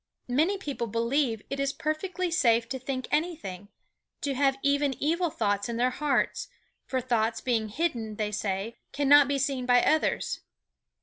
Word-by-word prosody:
Many 315 Hz, +11 st, +2 dB
people 285 Hz, -10 st, -4 dB
believe 230 Hz, +1 st, 0 dB
it 275 Hz, -, -2 dB
is 275 Hz, 0 st, +1 dB
perfectly 335 Hz, +5 st, -2 dB
safe 235 Hz, -7 st, +3 dB
to 265 Hz, +1 st, -3 dB
think 260 Hz, 0 st, -4 dB
anything, 300 Hz, -, -2 dB, 0.5 s
to 280 Hz, -, -1 dB
have 270 Hz, 0 st, +2 dB
even 280 Hz, -1 st, +2 dB
evil 335 Hz, +4 st, +1 dB
thoughts 205 Hz, -5 st, -1 dB
in 230 Hz, -, -3 dB
their 250 Hz, +2 st, +2 dB
hearts, 285 Hz, +1 st, 0 dB, 0.4 s
for 260 Hz, -, 0 dB
thoughts 230 Hz, -2 st, 0 dB
being 225 Hz, -3 st, 0 dB
hidden, 230 Hz, -5 st, -2 dB
they 210 Hz, 0 st, -2 dB
say, 205 Hz, +3 st, -3 dB, 0.2 s
cannot 285 Hz, 0 st, +6 dB
be 280 Hz, 0 st, 0 dB
seen 265 Hz, -2 st, -1 dB
by 245 Hz, -1 st, +5 dB
others. 315 Hz, -, +1 dB
260 Hz, 160 wpm, -28 LUFS, 230-290 Hz, 0.5 s, cannot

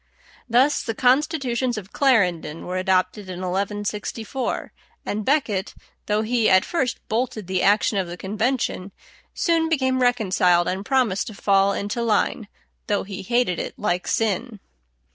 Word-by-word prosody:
Thus 255 Hz, +6 st, +3 dB
the 225 Hz, -, -4 dB
"Constitutions 255 Hz, -2 st, +1 dB
of 195 Hz, -2 st, -8 dB
Clarendon" 180 Hz, -, +1 dB
were 180 Hz, +1 st, -3 dB
adopted 185 Hz, +1 st, 0 dB
in 180 Hz, 0 st, -6 dB
1164, 205 Hz, +6 st, -3 dB, 0.3 s
and 210 Hz, +1 st, -2 dB
Becket, 220 Hz, -8 st, 0 dB, 0.3 s
though 210 Hz, +1 st, +1 dB
he 230 Hz, 0 st, +2 dB
at 185 Hz, 0 st, +5 dB
first 270 Hz, -8 st, -2 dB
bolted 225 Hz, -2 st, -2 dB
the 185 Hz, 0 st, -1 dB
action 205 Hz, 0 st, +3 dB
of 185 Hz, -, -2 dB
the 175 Hz, +1 st, -7 dB
convention, 210 Hz, -1 st, -2 dB, 0.4 s
soon 330 Hz, -3 st, +1 dB
became 260 Hz, -4 st, +1 dB
reconciled 185 Hz, -8 st, +3 dB
and 190 Hz, +2 st, -2 dB
promised 235 Hz, -5 st, +1 dB
to 215 Hz, -, -8 dB
fall 195 Hz, 0 st, +3 dB
into 205 Hz, +4 st, -3 dB
line, 220 Hz, 0 st, 0 dB, 0.4 s
though 205 Hz, -1 st, 0 dB
he 195 Hz, 0 st, -7 dB
hated 235 Hz, -3 st, 0 dB
it -, -, -5 dB
like 180 Hz, -3 st, -1 dB
sin. 225 Hz, +1 st, -1 dB
210 Hz, 145 wpm, -23 LUFS, 190-245 Hz, 0.4 s, at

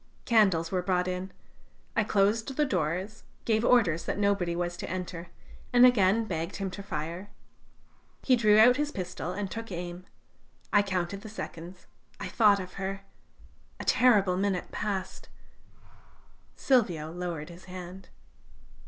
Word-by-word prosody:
Candles 195 Hz, -8 st, +3 dB
were 185 Hz, -1 st, 0 dB
brought 180 Hz, -1 st, 0 dB
in. 185 Hz, +1 st, -4 dB, 0.6 s
I 215 Hz, -, +3 dB
closed 210 Hz, +2 st, +1 dB
the 300 Hz, -, +3 dB
doors, 185 Hz, -, -2 dB, 0.2 s
gave 220 Hz, -1 st, +2 dB
orders 210 Hz, -10 st, +3 dB
that -, -, -2 dB
nobody 200 Hz, -4 st, +1 dB
was 175 Hz, 0 st, -2 dB
to -, -, -6 dB
enter, 180 Hz, -1 st, -5 dB, 0.4 s
and 245 Hz, 0 st, +7 dB
again 225 Hz, -2 st, +4 dB
begged 170 Hz, -2 st, -4 dB
him 195 Hz, -2 st, -3 dB
to 200 Hz, -, -7 dB
fire. 170 Hz, +1 st, -5 dB, 0.9 s
He 255 Hz, -, +4 dB
drew 215 Hz, -3 st, +4 dB
out 245 Hz, +3 st, +7 dB
his 295 Hz, 0 st, -1 dB
pistol 180 Hz, -, -5 dB
and 195 Hz, +1 st, -4 dB
took 225 Hz, -2 st, -6 dB
aim.... 175 Hz, +1 st, -6 dB, 0.7 s
I 205 Hz, -, +6 dB
counted 190 Hz, 0 st, -3 dB
the 215 Hz, -, -9 dB
seconds.... 180 Hz, -3 st, -8 dB, 0.3 s
I -, -, -5 dB
thought 210 Hz, -3 st, +4 dB
of 185 Hz, -1 st, -7 dB
her.... 195 Hz, +1 st, -3 dB, 0.8 s
A -, -, -6 dB
terrible 200 Hz, -7 st, +4 dB
minute 195 Hz, -1 st, -1 dB
passed! 200 Hz, -3 st, -4 dB, 1.3 s
Silvio 175 Hz, -, +1 dB
lowered 170 Hz, -3 st, -5 dB
his 175 Hz, +2 st, -13 dB
hand. 185 Hz, +1 st, -9 dB
190 Hz, 145 wpm, -28 LUFS, 175-215 Hz, 1.3 s, and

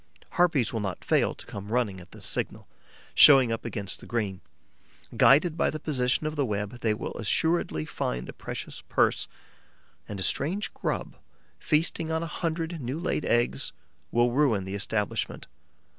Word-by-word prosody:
Harpies 165 Hz, -10 st, +2 dB
will 115 Hz, -, -1 dB
not 95 Hz, -4 st, -4 dB
fail -, -, +2 dB
to -, -, -11 dB
come 100 Hz, +1 st, -8 dB
running 115 Hz, -6 st, 0 dB
at 90 Hz, -, -16 dB
this -, -, -8 dB
signal, -, -, -2 dB, 0.5 s
showing 135 Hz, -5 st, +8 dB
up 115 Hz, -, -2 dB
against 100 Hz, -4 st, -3 dB
the -, -, -12 dB
green; 105 Hz, -6 st, -2 dB, 0.7 s
guided 155 Hz, +4 st, +5 dB
by 165 Hz, -, +2 dB
the 155 Hz, -, -4 dB
position 135 Hz, -1 st, 0 dB
of 155 Hz, 0 st, -2 dB
the 145 Hz, -, +1 dB
web, 105 Hz, 0 st, -3 dB
they 110 Hz, -, +1 dB
will 105 Hz, -, -3 dB
assuredly 115 Hz, -, +1 dB
find 60 Hz, -4 st, -3 dB
the -, -, -8 dB
precious -, -, -6 dB
purse; -, -, +2 dB, 0.8 s
and 100 Hz, -2 st, -5 dB
a -, -, 0 dB
strange 180 Hz, -, +1 dB
grub, -, -, -3 dB, 0.4 s
feasting 160 Hz, +1 st, 0 dB
on 160 Hz, +1 st, 0 dB
a 165 Hz, -, -6 dB
hundred 165 Hz, -1 st, -2 dB
new 130 Hz, +4 st, -3 dB
laid 175 Hz, -3 st, -1 dB
eggs, 120 Hz, 0 st, +1 dB, 0.4 s
will 120 Hz, +1 st, +3 dB
ruin 125 Hz, -7 st, +2 dB
the 95 Hz, +1 st, -6 dB
establishment. 105 Hz, 0 st, -2 dB
125 Hz, 165 wpm, -27 LUFS, 105-155 Hz, 0.8 s, showing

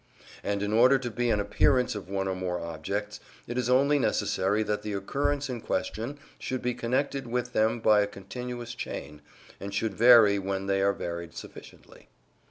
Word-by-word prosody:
And 100 Hz, 0 st, -1 dB
in 105 Hz, +1 st, -1 dB
order 125 Hz, +4 st, +6 dB
to 120 Hz, -2 st, -5 dB
be 120 Hz, +2 st, -1 dB
an 105 Hz, -, +2 dB
appearance 125 Hz, +5 st, +2 dB
of 105 Hz, -3 st, -7 dB
one 95 Hz, 0 st, -1 dB
or 95 Hz, -, 0 dB
more 90 Hz, -1 st, -3 dB
objects, 95 Hz, +6 st, -4 dB, 0.3 s
it 120 Hz, -, -5 dB
is 125 Hz, -1 st, -1 dB
only 140 Hz, +3 st, +4 dB
necessary 105 Hz, -4 st, +1 dB
that 105 Hz, -1 st, -2 dB
the 105 Hz, -, -4 dB
occurrence 140 Hz, +8 st, -1 dB
in 125 Hz, -3 st, -5 dB
question 120 Hz, +7 st, -3 dB, 0.2 s
should 130 Hz, -1 st, -4 dB
be 125 Hz, 0 st, 0 dB
connected 130 Hz, +3 st, -1 dB
with 125 Hz, +1 st, -2 dB
them 110 Hz, +2 st, +2 dB
by 105 Hz, -2 st, +5 dB
a 100 Hz, -, +1 dB
continuous 120 Hz, +4 st, -7 dB
chain, 75 Hz, -10 st, -7 dB, 0.4 s
and 100 Hz, -, -6 dB
should 110 Hz, 0 st, -1 dB
vary 110 Hz, -2 st, +7 dB
when 95 Hz, 0 st, -3 dB
they 95 Hz, 0 st, +1 dB
are 100 Hz, 0 st, +3 dB
varied 85 Hz, -3 st, -6 dB
sufficiently. -, -, -12 dB
110 Hz, 180 wpm, -28 LUFS, 100-125 Hz, 0.4 s, vary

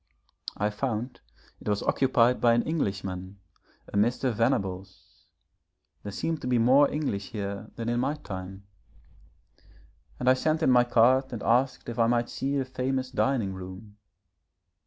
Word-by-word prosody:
I 105 Hz, +1 st, 0 dB
found 120 Hz, +2 st, -3 dB, 0.4 s
it -, -, -5 dB
was 105 Hz, -1 st, 0 dB
occupied 125 Hz, -2 st, +2 dB
by 120 Hz, -1 st, +5 dB
an 120 Hz, -, +2 dB
Englishman, 100 Hz, -, -3 dB, 0.5 s
a -, -, -9 dB
Mr. 120 Hz, +4 st, +1 dB
Venables 95 Hz, -5 st, -3 dB, 0.7 s
there 100 Hz, -, -6 dB
seem 165 Hz, +9 st, -2 dB
to -, -, -6 dB
be 125 Hz, -1 st, +2 dB
more 130 Hz, +5 st, +5 dB
English 120 Hz, -10 st, -3 dB
here 100 Hz, 0 st, -5 dB
than 115 Hz, -1 st, -5 dB
in 120 Hz, 0 st, 0 dB
my 135 Hz, +4 st, 0 dB
time 95 Hz, -5 st, -8 dB, 1.5 s
and 125 Hz, -, -3 dB
I 130 Hz, -, +8 dB
sent 155 Hz, +4 st, 0 dB
in 130 Hz, -, +4 dB
my 125 Hz, -1 st, +5 dB
card 125 Hz, +3 st, +3 dB
and 115 Hz, -4 st, -5 dB
asked 130 Hz, +3 st, +1 dB
if 120 Hz, 0 st, -5 dB
I 115 Hz, -, +4 dB
might 120 Hz, 0 st, 0 dB
see 140 Hz, +1 st, -2 dB
the 135 Hz, -, 0 dB
famous 130 Hz, 0 st, -2 dB
dining 125 Hz, -7 st, 0 dB
room. 95 Hz, +3 st, -10 dB
120 Hz, 155 wpm, -27 LUFS, 100-130 Hz, 1.5 s, I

